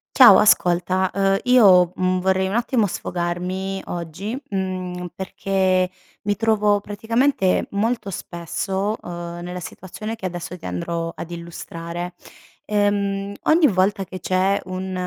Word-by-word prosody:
Ciao 240 -7 +9
ascolta, 185 -2 +3
ehm, 195 0 +2
io, 195 -8 +6
mhmm, 185 0 +1
vorrei 190 0 +2
un 190 - -3
attimo 235 0 +2
sfogarmi 185 +2 -3
oggi, 175 +7 -5
mhmm, 185 -2 -3
perché 190 -1 0 0.4
mi 205 0 +1
trovo 210 -1 +2
praticamente 225 0 +1
molto 205 0 -1
spesso, 190 +5 -3
uhm, 175 0 -6
nella 180 +1 -5
situazione 205 +5 -7
che 190 -4 -4
adesso 175 0 -6
ti 175 - -8
andrò 170 -1 -3
ad 165 +1 -7
illustrare. 170 +1 -6 0.5
Ehm, 200 -1 0
ogni 315 0 +5
volta 195 -1 +1
che 185 0 -8
c'è 190 +2 +1
un 185 0 -5
190 Hz, 125 wpm, -22 LUFS, 180-205 Hz, 0.5 s, Ciao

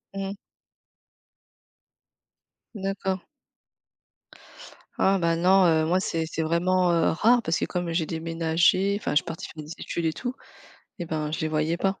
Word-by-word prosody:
Mmh 195 - -3
mh. 195 - -4 2.4
D'accord. 195 -2 -2 1.8
Ah 195 0 +3
ben 170 -1 +1
non, 185 +2 +5
heu, 160 -1 +3
moi 180 +3 +2
c'est 165 -3 -2
c'est 160 0 -4
vraiment, 175 +3 +2
heu, 165 -1 +3
rare 235 +8 +4
parce 160 - 0
que - - 0
comme 175 -2 -3
j'ai 165 -1 0
déménagé, 165 +4 +1
enfin, - - -3
je 150 - +3
suis - - +3
partie 165 -1 -6
faire 155 - -9
des 150 - -10
études 170 - -4
et 160 - +1
tout 245 +6 -4 0.7
et 175 - -3
ben, 155 -1 -2
je 160 - -3
les 160 - 0
voyais 155 +2 0
pas. 195 +2 -1
170 Hz, 165 wpm, -26 LUFS, 160-190 Hz, 2.4 s, non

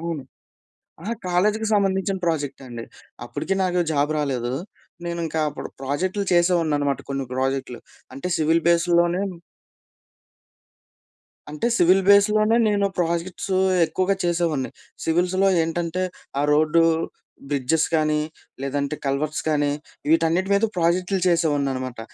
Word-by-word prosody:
అవును. 165 -3 -4 0.8
అహా! 215 +6 -3
కాలేజీకి 210 +5 +1
సంబంధించిన 195 -1 +1
ప్రాజెక్టండి. 135 -7 -3 0.4
అప్పటికి 195 - -3
నాకు 180 -1 +1
జాబ్ 145 0 +1
రాలేదు. 130 -4 -1 0.5
నేను 170 0 -3
ఇంకా 160 0 -2
అప్పుడు 145 - -7
ప్రాజెక్టులు 185 +9 -1
చేసేవాడినన్నమాట 160 -6 +2
కొన్ని 135 -1 -2
ప్రాజెక్టులు. 130 -1 -2 0.4
అంటే 135 - -4
సివిల్ 160 +1 +2
బేస్‌లోనే 170 +1 +3 2.3
అంటే 150 +10 -2
సివిల్ 185 +2 +5
బేస్‌లోనే 215 +2 +5
నేను 200 -1 +2
ప్రాజెక్ట్సు 175 +3 -1 0.3
ఎక్కువగా 185 +4 0
చేసేవాడిని. 170 -6 0 0.3
సివిల్స్‌లో 180 +4 +2
ఏంటంటే, 170 +2 -2 0.4
ఆ - - +2
రోడ్డు, 155 +2 +4 0.7
బ్రిడ్జెస్ 145 +3 +1
కానీ 155 -1 +1 0.4
లేదంటే 140 +2 -2
కల్వర్ట్స్ 150 +3 -1
కానీ, 145 -1 +2 0.4
వీటన్నిటి 165 +4 +2
మీద 200 - +3
ప్రాజెక్టులు 180 +3 +1
చేసేవాడినన్నమాట. 140 -7 0
165 Hz, 105 wpm, -23 LUFS, 145-185 Hz, 2.3 s, సివిల్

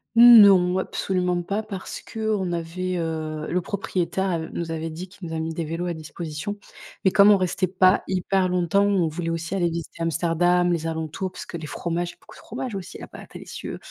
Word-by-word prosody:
Non, 200 -7 +8
absolument 180 -2 -1
pas 200 +4 -2
parce 200 -3 -7
qu'on 215 -5 -2
avait, 175 +2 -3
heu, 155 -2 -3
le 180 +1 0
propriétaire 190 -1 -2
av 160 -1 -3
nous 165 -1 -4
avait 160 0 -3
dit 170 +4 -7
qu'il 180 -2 -10
nous 160 - -4
a 160 - -2
mis 160 0 -3
des 165 -1 -3
vélos 165 +3 -3
à 175 - -2
disposition 160 +5 -6 0.5
mais 190 - +5
comme 205 0 +7
on 205 - +7
restait 185 0 0
pas 185 +1 +4
hyper 185 0 +1
longtemps, 180 +2 +2
on 195 -4 +2
voulait 165 +2 -3
aussi 165 +2 -3
aller 175 -3 +1
visiter 165 0 -6
Amsterdam, 175 +2 +2
les 165 -1 -2
alentours 160 +3 -3
parce - - -8
que 170 - -6
les 160 -2 -7
fromages 170 +2 -3
il - - -10
y - - -25
a - - -41
beaucoup - - -16
de - - -14
fromages 245 +1 -6
aussi 190 -2 -7
là - - -9
bas, - - -11
délicieux. - - -7
175 Hz, 215 wpm, -24 LUFS, 165-190 Hz, 0.5 s, Non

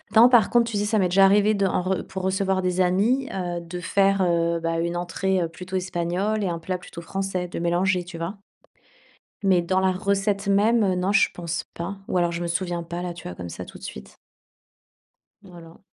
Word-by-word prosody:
non, 230 +3 +8
par 240 -5 +5
contre, 235 -1 +2
tu 210 - -1
sais, 205 - 0
ça 215 +1 +1
m'est 185 -3 +2
déjà 195 +2 +6
arrivé 205 +2 +4
de 200 -1 +1
en 180 - 0
re 190 +1 -2
pour 190 -1 -6
recevoir 190 0 0
des 180 0 +1
amis, 215 +10 +2
heu, 175 -2 -3
de 170 +1 -7
faire, 195 +2 +2
heu, 170 -1 +1
bah, 165 0 -1
une 170 +1 -1
entrée, 180 +2 -1
heu, - - -1
plutôt 180 +3 -8
espagnole 185 +3 -1
et - - 0
un 170 - -2
plat 180 +2 -3
plutôt 170 -1 -10
français, 190 0 -3
de 175 - -6
mélanger. 175 +2 +1
Tu 175 -1 -9
vois? 175 +5 -5 1.1
Mais 185 -2 +4
dans 185 +2 0
la 190 0 +2
recette 200 +1 -1
même, 215 +4 +3
heu, 190 -2 +2
non, 185 +2 0
je - - +4
pense 170 -2 -4
pas 180 +4 -5
ou - - -1
alors 175 -1 +2
je 170 - -4
me - - -2
souviens 175 0 -2
pas, 170 +1 -5
là, 180 -1 -3
tu 170 - -9
vois, 90 - -7
comme 90 -1 -7
ça, - - -7
tout - - -12
de - - -19
suite. 65 0 -9 1.3
Voilà. 170 -3 -14
185 Hz, 225 wpm, -24 LUFS, 170-195 Hz, 1.3 s, non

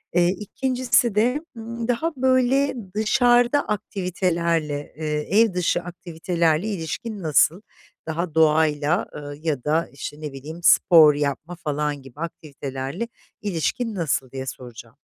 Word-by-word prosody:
Eee, 175 -1 +5
2'ncisi 245 +3 0
de, 245 +7 +2 0.2
ımm, 230 +1 -5
daha 315 +8 0
böyle 260 +2 +2 0.2
dışarıda 240 +5 +3
aktivitelerle, 170 -7 -1
eee, 155 +5 0
ev 225 -4 +3
dışı 175 -1 +1
aktivitelerle 170 0 -1
ilişkin 205 +3 -4
nasıl? 160 +4 +3 0.5
Daha 165 0 -3
doğayla, 155 0 +3
ııı, 145 -1 -7
ya 150 -6 -2
da, 160 +3 +1
işte, 145 +2 -7
ne 150 -2 -5
bileyim, 150 +5 -8
spor 160 -3 +7
yapma 145 +4 -3
falan 150 -3 -2
gibi 135 +1 -15
aktivitelerle 140 - -5 0.3
ilişkin 210 +4 -2
nasıl, 140 -7 -1
diye 130 -1 -5
soracağım. 120 -1 -9
170 Hz, 125 wpm, -23 LUFS, 150-215 Hz, 0.5 s, spor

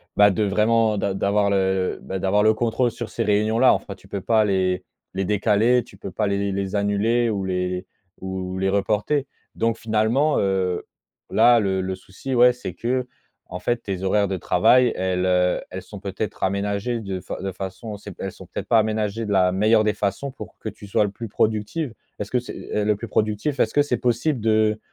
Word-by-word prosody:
bah, 105 0 +7
de 105 +3 0
vraiment 110 +2 +2
d'a 100 0 -1
d'avoir 100 +1 +1
le 95 -1 +1
le, - - -13
bah, 95 - -4
d'avoir 100 +3 +2
le 110 0 +5
contrôle 120 +2 0
sur 120 0 -6
ces 115 - -2
réunions-là. 110 +4 +4
Enfin, 100 - -4
tu 95 - -20
peux 100 -1 -4
pas 110 +2 +3
les 95 -2 0 0.3
les 95 0 -1
décaler, 105 +4 +3
tu - - -17
peux - - -7
pas 105 -2 -1
les 100 0 -1
les 100 0 -2
annuler 110 +4 +1
ou 100 -3 -2
les 90 0 -2 0.4
ou 95 0 -4
ou - - -4
les 95 +1 +1
reporter. 105 +8 0 0.3
Donc 115 0 +1
finalement, 115 +7 +1
heu, 95 -2 0 0.5
là 120 -1 +6
le 95 -2 0
le 95 0 -3
souci, 95 +8 -6
ouais, 125 +1 +6
c'est 125 - -7
qu'en 125 -6 -5
fait 120 +5 -1
tes 95 -2 -4
horaires 100 +1 +2
de 95 - -1
travail, 120 +9 +4
elles, 90 0 0
heu, 90 0 +2
elles - - -5
sont - - -10
peut-être - - -5
aménagées 100 +4 -1
de 95 -2 -4
fa - - -7
de 95 0 -3
façon 95 +3 -6
c'est 100 0 -10
p - - -9
elles 95 - -3
sont - - -13
peut-être - - -7
pas 115 -2 +6
aménagées 110 0 -1
de 105 - -1
la 90 -1 +4
meilleure 110 +3 +3
des 105 0 +1
façons 105 +7 -2
pour - - -11
que - - -4
tu 100 - -12
sois 100 - +2
le 105 - -1
plus 115 +2 -7
productive. 110 +7 -1 0.2
Est-ce 105 - -6
que 125 - +2
c'est, 125 - -8 0.2
heu, 105 -1 +1
le 105 -1 +3
plus 115 +3 -7
productif? 110 +6 0
Est-ce 110 - +2
que 145 - +4
c'est 135 -4 0
possible 125 +4 0
de 110 0 +2
105 Hz, 215 wpm, -23 LUFS, 95-115 Hz, 0.5 s, bah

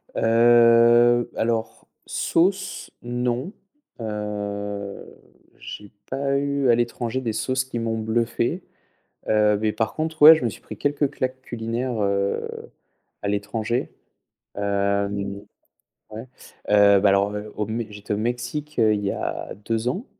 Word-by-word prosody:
Heu, 120 +1 +5
alors 115 -1 -2 0.2
sauce, 190 +3 0
non, 125 +5 -2 0.5
heu, 105 -2 -5 0.5
j'ai 105 -1 -9 0.2
pas 140 +1 0
eu 140 -1 0
à 120 - +6
l'étranger 120 +1 -2
des 115 -3 -2
sauces 130 +3 -1
qui 125 -2 -5
m'ont 115 -1 -2
bluffé, 115 - -1 0.7
heu, 105 -1 +3
mais 110 -1 +1
par 110 +1 -2
contre, 160 0 -3
ouais, 155 +2 +12
je 155 - -4
me 115 - +1
suis - - -12
pris 110 - -10
quelques 145 +3 0
claques 130 0 -3
culinaires, 120 0 -3
heu, 100 -1 0 0.8
à 100 - -2
l'étranger. 105 +4 -2 0.7
Hem, 100 0 -1 0.7
ouais, 110 +4 -8 0.4
heu, 100 -1 +6
bah 100 +1 +4
alors 100 +1 +2 0.2
au 105 - -2
Mé 110 +1 -3
j'étais 105 0 -5
au - - -1
Mexique, 120 +7 -3
heu, 110 -1 +4
il 105 - -1
y 100 - 0
a - - -4
2 115 +1 -1
ans 195 - -4
115 Hz, 135 wpm, -23 LUFS, 105-125 Hz, 0.8 s, ouais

